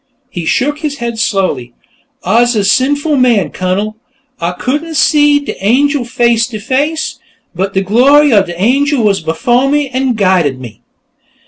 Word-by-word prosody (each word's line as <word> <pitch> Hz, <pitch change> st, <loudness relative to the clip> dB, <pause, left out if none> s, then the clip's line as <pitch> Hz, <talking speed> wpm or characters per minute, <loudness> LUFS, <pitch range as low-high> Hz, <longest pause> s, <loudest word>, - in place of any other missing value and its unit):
He 170 Hz, -6 st, -5 dB
shook 290 Hz, -, 0 dB
his 300 Hz, -3 st, -4 dB
head 235 Hz, -2 st, -4 dB
slowly. 185 Hz, -, -2 dB, 0.5 s
"Ah's 235 Hz, +6 st, +2 dB
a 210 Hz, -, +1 dB
sinful 285 Hz, +8 st, +1 dB
man, 240 Hz, -7 st, +2 dB
Cunnel; 200 Hz, +4 st, -3 dB, 0.4 s
Ah 170 Hz, +1 st, -2 dB
couldn't 300 Hz, -, -3 dB
see 295 Hz, -1 st, +3 dB
de 285 Hz, -8 st, -8 dB
angel 270 Hz, +5 st, +1 dB
face 235 Hz, -1 st, +1 dB
to 220 Hz, -4 st, -7 dB
face, 280 Hz, +8 st, -2 dB, 0.3 s
but 195 Hz, +3 st, -3 dB
de 190 Hz, -, +2 dB
glory 270 Hz, +7 st, +4 dB
of 200 Hz, -2 st, +3 dB
de 175 Hz, 0 st, -8 dB
angel 275 Hz, +5 st, +1 dB
was 200 Hz, -3 st, +1 dB
befoh 240 Hz, +12 st, 0 dB
me, 290 Hz, -1 st, 0 dB
an' 260 Hz, 0 st, -1 dB
guided 185 Hz, -, +1 dB
me." 120 Hz, -5 st, -11 dB
235 Hz, 155 wpm, -12 LUFS, 195-280 Hz, 0.5 s, glory